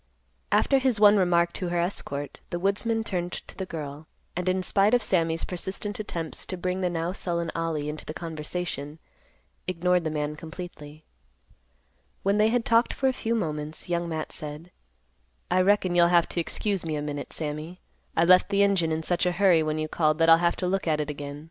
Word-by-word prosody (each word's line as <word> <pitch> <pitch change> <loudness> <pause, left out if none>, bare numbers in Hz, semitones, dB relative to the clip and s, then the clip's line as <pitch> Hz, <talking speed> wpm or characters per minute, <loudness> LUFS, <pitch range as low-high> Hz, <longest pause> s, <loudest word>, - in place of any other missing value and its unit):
After 275 - +4
his 260 -5 +1
one 210 0 +7
remark 175 -2 +3
to 180 - -3
her 175 0 0
escort, 145 -5 -3
the 175 - -2
woodsman 210 +5 0
turned 180 -4 -3
to - - -7
the 190 - -5
girl, 150 -2 -7 0.3
and, 180 +1 -1
in 185 0 0
spite 200 +5 +3
of 245 - +1
Sammy's 165 -5 +1
persistent 190 +3 -3
attempts 170 -6 -3
to 185 - -4
bring 180 +1 -2
the 180 - +1
now 170 0 -2
sullen 170 -3 -2
Ollie 165 -3 -2
into 150 +1 -5
the 155 - -6
conversation, 160 -2 -5 0.7
ignored 180 0 +1
the 160 - -1
man 150 -1 -2
completely. 160 -2 -9 1.2
When 200 +2 +2
they 215 - +5
had 240 0 +1
talked 230 +1 +3
for 265 - +2
a - - 0
few 230 -1 -1
moments, 155 -5 -3
Young 170 0 -1
Matt 160 -1 -4
said, 155 +3 -6 0.8
"I 185 +1 +4
reckon 190 -1 +3
you'll 175 -1 +5
have 170 -1 +4
to - - -2
excuse 195 +2 -1
me 160 -2 -2
a 150 - -2
minute, 145 -1 -5
Sammy; 155 +3 -5 0.4
I 165 - +5
left 185 +2 +6
the 200 0 +3
engine 190 -5 +2
in 160 0 -1
such 175 +2 +1
a - - +2
hurry 180 -3 +4
when 155 0 -1
you 155 0 -1
called 155 -1 +1
that 165 0 +5
I'll 165 - +9
have 170 0 +2
to 180 - -2
look 190 0 -1
at 155 -1 +2
it 150 0 -2
again. 145 0 -7
175 Hz, 205 wpm, -26 LUFS, 155-190 Hz, 1.2 s, I'll